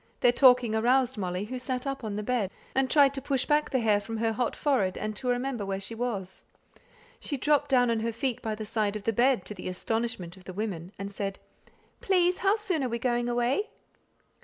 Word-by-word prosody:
Their 245 - +6
talking 250 -3 +5
aroused 250 +3 +2
Molly, 185 -1 -3
who 255 +3 -5
sat 255 0 -3
up 275 -2 -3
on 210 -2 -3
the 210 - -3
bed, 230 -4 0 0.2
and 265 0 +1
tried 280 0 +5
to 270 - -4
push 270 -1 0
back 300 0 +2
the 265 - +1
hair 215 -3 +3
from 225 +2 -6
her 225 0 0
hot 240 +2 -1
forehead, 230 -11 +1
and 215 0 -3
to 255 - -5
remember 245 -2 -1
where 195 -1 -3
she 195 +4 -6
was. 215 -6 -4 0.8
She 285 - -3
dropped 290 +1 +2
down 245 -3 +4
on 230 - +1
her 230 +1 -1
feet 235 +2 -2
by 220 -1 -2
the 215 0 -6
side 215 -1 -1
of 210 - -5
the 225 - 0
bed, 245 -2 +3
to - - -4
the 185 -2 -6
astonishment 210 -2 -3
of 185 -1 -17
the 185 - -7
women, 190 -4 -4
and 195 +1 -5
said, 195 -1 -4 0.6
"Please, 360 -2 +2
how 395 +1 +3
soon 385 -9 -1
are 255 - -1
we 235 - -1
going 240 0 0
away?" 245 - 0
235 Hz, 225 wpm, -28 LUFS, 210-265 Hz, 0.8 s, Their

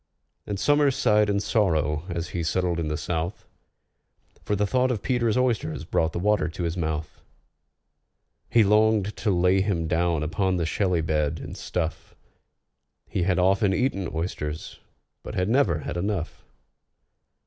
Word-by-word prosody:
And 100 -2 -3
SOMERS 145 0 +3
sighed 105 0 +3
in 100 0 +1
sorrow 80 -8 +1
as 85 -1 -3
he 85 - -3
settled 85 +1 0
in 80 - -1
the 75 0 -2
south, 85 +2 -3 1.0
For 105 - 0
the 105 +1 +1
thought 130 +4 +1
of 115 -5 -2
PETER'S 120 -3 +1
oysters 110 - 0
brought 80 0 0
the - - -5
water 100 -3 +2
to 85 +2 -5
his 85 0 -1
mouth. 80 -2 -3 1.3
He 115 - +5
longed 105 0 +3
to - - -1
lay 90 +1 +3
him 90 -5 -1
down 85 -1 +1
upon 95 +4 0
the 85 - 0
shelly 90 0 0
bed, 75 -1 0
and - - -8
stuff: 85 -2 -4 0.9
He 95 - -2
had 90 +1 +1
often 95 +2 +3
eaten 100 -8 0
oysters, 80 -2 -4 0.4
but - - -8
had 90 +2 0
never 110 - +2
had - - -4
enough. 95 -2 -3
90 Hz, 155 wpm, -25 LUFS, 80-105 Hz, 1.3 s, He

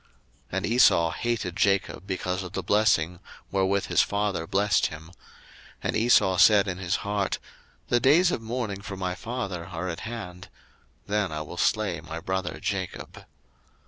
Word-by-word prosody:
01:027:041 - - -33 0.5
And - - -1
Esau 95 -8 +4
hated 115 -5 -2
Jacob 100 -1 0
because 90 -1 -2
of 90 -2 -8
the - - -3
blessing 95 -5 +2 0.3
wherewith 95 0 +1
his - - +3
father 100 -5 -1
blessed 100 +1 +2
him: 80 +2 -10 0.7
and - - -1
Esau 110 -5 +4
said 100 +2 +6
in 90 -1 -3
his 90 -2 0
heart, 100 -1 -1 0.5
The 120 - +3
days 160 +9 +5
of 115 - -2
mourning 110 -4 -4
for 100 -1 -7
my 90 -1 -2
father 100 -6 -5
are 90 +1 -4
at 85 - -5
hand; 90 -6 -7 0.6
then 105 -1 0
will 75 0 -6
I - - -9
slay 100 -7 +1
my 80 0 -6
brother 95 +1 -3
Jacob. 100 -3 -5
95 Hz, 160 wpm, -26 LUFS, 90-105 Hz, 0.7 s, said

